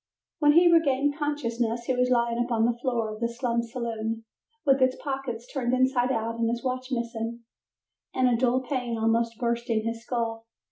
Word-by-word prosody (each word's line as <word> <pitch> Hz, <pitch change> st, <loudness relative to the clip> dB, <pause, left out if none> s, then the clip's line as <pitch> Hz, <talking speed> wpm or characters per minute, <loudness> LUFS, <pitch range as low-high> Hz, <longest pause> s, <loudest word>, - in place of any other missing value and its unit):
When 295 Hz, -1 st, +5 dB
he 345 Hz, +3 st, +6 dB
regained 290 Hz, -3 st, +3 dB
consciousness 240 Hz, -6 st, -1 dB
he 260 Hz, -, 0 dB
was 250 Hz, 0 st, +2 dB
lying 235 Hz, -1 st, +2 dB
upon 230 Hz, -2 st, +1 dB
the 240 Hz, 0 st, +1 dB
floor 235 Hz, -4 st, -1 dB
of 215 Hz, -, -9 dB
the 235 Hz, -, +1 dB
slum 235 Hz, 0 st, -1 dB
saloon, 230 Hz, -1 st, -4 dB, 0.4 s
with 270 Hz, -1 st, +4 dB
his 260 Hz, 0 st, +3 dB
pockets 265 Hz, -4 st, -4 dB
turned 255 Hz, -3 st, 0 dB
inside 260 Hz, -1 st, +2 dB
out 230 Hz, -1 st, -2 dB
and 230 Hz, -1 st, +2 dB
his 235 Hz, 0 st, -2 dB
watch 255 Hz, 0 st, -3 dB
missing, 235 Hz, -1 st, -3 dB, 0.7 s
and 255 Hz, -1 st, +2 dB
a 245 Hz, -, +3 dB
dull 250 Hz, +2 st, +2 dB
pain 245 Hz, -3 st, -2 dB
almost 230 Hz, +1 st, +1 dB
bursting 235 Hz, -2 st, -1 dB
his 230 Hz, 0 st, -3 dB
skull. 230 Hz, -2 st, -3 dB
240 Hz, 180 wpm, -27 LUFS, 230-260 Hz, 0.7 s, he